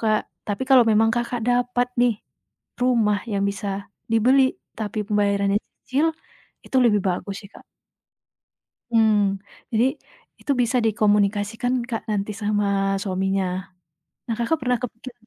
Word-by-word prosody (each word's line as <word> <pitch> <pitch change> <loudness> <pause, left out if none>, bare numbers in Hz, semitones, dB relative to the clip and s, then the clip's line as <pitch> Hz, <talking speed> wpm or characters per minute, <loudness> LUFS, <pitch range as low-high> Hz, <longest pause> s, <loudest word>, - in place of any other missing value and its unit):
Kak. 215 -1 +3 0.3
Tapi, 205 +5 -2
kalau 260 -2 +8
memang 220 +1 +4
Kakak, 240 0 -2
dapat 245 0 +1
nih 245 -2 +4 0.7
rumah 225 -5 +2
yang 200 0 0
bisa 200 0 -5 0.3
dibeli 260 +4 +4 0.2
tapi 215 -1 -4
pembayarannya 200 -1 +2 0.3
cicil, 280 +5 +1 0.6
itu - - -2
lebih 210 -3 +4
bagus 185 +2 -3
sih 200 - -13
Kak. - - -14 1.3
Hmm, 220 -2 +4 0.6
jadi 230 +2 +3 0.5
itu - - -2
bisa 240 +1 +1
dikomunikasikan 210 +2 +1 0.2
Kak, 225 -2 -2
nanti 210 0 -1
sama 205 0 +1 0.4
suaminya. 190 0 0 0.8
Nah, 230 - -2
Kakak, 240 +8 +1
pernah 250 -1 +1
kepikir 250 +1 -7
220 Hz, 125 wpm, -23 LUFS, 205-245 Hz, 1.3 s, kalau